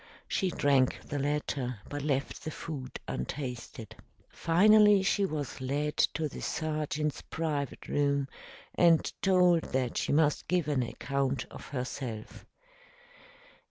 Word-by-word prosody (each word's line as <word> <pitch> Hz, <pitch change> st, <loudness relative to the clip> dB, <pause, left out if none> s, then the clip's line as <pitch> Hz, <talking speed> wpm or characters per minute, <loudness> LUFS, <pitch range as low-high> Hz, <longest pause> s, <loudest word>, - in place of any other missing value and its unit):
She 190 Hz, -, 0 dB
drank 140 Hz, -5 st, +2 dB
the 145 Hz, -, -3 dB
latter, 140 Hz, -4 st, -2 dB
but 145 Hz, 0 st, -4 dB
left 140 Hz, -1 st, -2 dB
the -, -, -3 dB
food 145 Hz, -4 st, -6 dB
untasted. 120 Hz, -, -5 dB, 0.3 s
Finally, 210 Hz, +3 st, +5 dB
she 200 Hz, 0 st, +2 dB
was 150 Hz, -6 st, -4 dB
led 145 Hz, +3 st, -1 dB, 0.2 s
to 155 Hz, 0 st, 0 dB
the -, -, -8 dB
sergeant's 150 Hz, -1 st, -2 dB
private 150 Hz, -4 st, -3 dB
room 140 Hz, -1 st, +1 dB, 0.5 s
and 170 Hz, -2 st, +4 dB
told 180 Hz, -3 st, +4 dB
that 130 Hz, -2 st, 0 dB
she -, -, 0 dB
must 150 Hz, 0 st, +2 dB
give 180 Hz, -4 st, +1 dB
an 145 Hz, -4 st, +1 dB
account 135 Hz, +2 st, -2 dB
of -, -, -10 dB
herself. 125 Hz, -4 st, -5 dB
145 Hz, 125 wpm, -30 LUFS, 130-160 Hz, 0.5 s, Finally